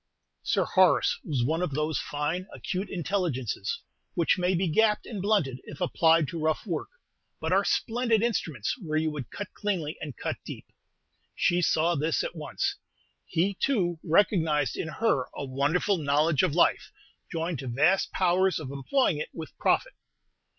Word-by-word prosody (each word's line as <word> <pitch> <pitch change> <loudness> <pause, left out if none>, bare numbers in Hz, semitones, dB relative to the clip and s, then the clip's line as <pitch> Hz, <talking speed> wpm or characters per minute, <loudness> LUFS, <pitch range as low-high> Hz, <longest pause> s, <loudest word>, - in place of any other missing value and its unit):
Sir - - +1
Horace 480 - +3
was 140 -8 -1
one 160 +7 0
of 155 -7 -2
those 155 +1 0
fine, 160 +4 -2
acute 200 -4 -4
intelligences 160 - -2 0.3
which 170 +2 +2
may 180 +1 +2
be 180 +2 +1
gapped 210 +6 +2
and 210 -5 -5
blunted 185 -11 +1
if - - -10
applied 165 -3 +3
to 170 - -5
rough 155 +5 0
work, 170 -6 -3 0.5
but - - -1
are - - +4
splendid 230 -2 +1
instruments 160 - -1
where 155 -6 -2
you 155 0 +1
would 145 -6 -6
cut 205 - -7
cleanly 180 -8 -2
and 145 -7 -6
cut - - -3
deep. - - -8 0.7
She 175 +1 +2
saw 165 +1 +2
this 155 +1 0
at - - -5
once. 390 - -2 0.5
He, 180 +4 +1
too, 185 -7 0
recognized 160 -5 +2
in - - -3
her 155 - 0
a 140 - -4
wonderful 145 +9 +1
knowledge 150 +1 +2
of 175 -5 +1
life, 175 - +2 0.4
joined 165 -3 -2
to 130 - -6
vast 150 +11 +2
powers 185 +1 +2
of 140 -4 -6
employing 150 - +1
it - - -4
with 160 -3 -8
profit. - - +2
165 Hz, 165 wpm, -28 LUFS, 150-190 Hz, 0.7 s, are